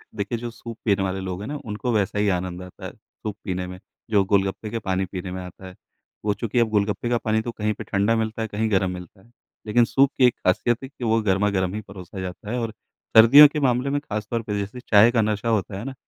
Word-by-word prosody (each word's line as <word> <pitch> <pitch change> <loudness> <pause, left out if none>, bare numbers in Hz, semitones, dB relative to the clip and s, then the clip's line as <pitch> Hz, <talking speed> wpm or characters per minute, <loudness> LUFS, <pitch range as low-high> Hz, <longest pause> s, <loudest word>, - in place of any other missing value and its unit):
देखिए, 105 +2 -2
जो 120 +1 -5
सूप 115 0 -9
पीने 100 -2 +2
वाले 95 0 -2
लोग 95 0 -5
हैं 105 - -6
ना, 150 - -4
उनको 110 +3 -3
वैसा 105 -1 0
ही 105 - +2
आनंद 90 0 -5
आता 90 - -11
है - - -5
सूप 105 -2 -9
पीने 90 -1 -3
में, 90 0 -9 0.3
जो 100 -3 +4
गोलगप्पे 100 +2 +1
का 115 - -3
पानी 95 0 0
पीने 95 0 -6
में 95 0 -5
आता 90 +1 -10
है। 90 - -12 0.5
वो 105 - +2
चूँकि 115 +3 -1
अब 115 -2 +3
गोलगप्पे 105 +3 0
का 120 - +2
पानी 110 -1 0
तो 120 - -4
कहीं 105 -1 -2
पे - - -8
ठंडा 100 +3 +1
मिलता 110 0 -2
है, 110 - -1
कहीं 110 +1 -1
गरम 95 -1 +2
मिलता 90 +2 -10
है। 120 - -25 0.4
लेकिन 115 +2 +4
सूप 135 +2 +3
की 130 - +5
एक 125 - +3
ख़ासियत 120 +7 0
है - - -5
कि 130 - -11
वो 115 0 +2
गरमागरम 95 -1 +1
ही 110 - -4
परोसा 95 0 -9
जाता 95 +3 -6
है 125 - -1
और 115 -1 -3 0.5
सर्दियों 140 +7 +10
के 150 +1 -3
मामले 130 0 +1
में 145 +1 0
ख़ासतौर 110 -2 -3
पे, 105 -2 -3
जैसे 100 +5 -5
चाय 110 +3 +7
का 115 -2 +2
नशा 110 +2 -1
होता 105 -3 -1
है 105 - -6
ना, 135 - -5
105 Hz, 255 wpm, -23 LUFS, 95-115 Hz, 0.5 s, सर्दियों